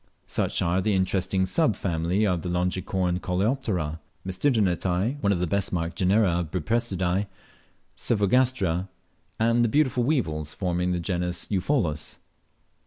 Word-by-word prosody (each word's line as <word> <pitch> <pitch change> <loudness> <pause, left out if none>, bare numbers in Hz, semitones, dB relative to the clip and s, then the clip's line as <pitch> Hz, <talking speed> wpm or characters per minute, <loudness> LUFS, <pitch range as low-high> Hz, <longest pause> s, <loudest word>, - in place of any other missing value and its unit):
Such - - -1
are 90 +2 +1
the 105 +1 +1
interesting 95 0 +1
sub 145 - +2
family 90 +4 0
of 90 -4 0
Longicorn 90 0 -1
coleoptera 90 - -1 0.3
Tmesisternitae; 95 - 0
one 100 - +2
of 100 - +2
the 90 - 0
best 100 +3 -1
marked 85 -2 -2
genera 95 0 +3
of 85 -3 -3
Buprestidae 95 +1 0 0.7
Cyphogastra; 100 -5 +1 0.5
and 115 +1 +3
the 120 - +2
beautiful 130 -2 +2
weevils 80 - -1
forming 90 -1 -1
the 90 - 0
genus 90 0 -2
Eupholus. 95 - -1
95 Hz, 125 wpm, -26 LUFS, 90-110 Hz, 0.7 s, genera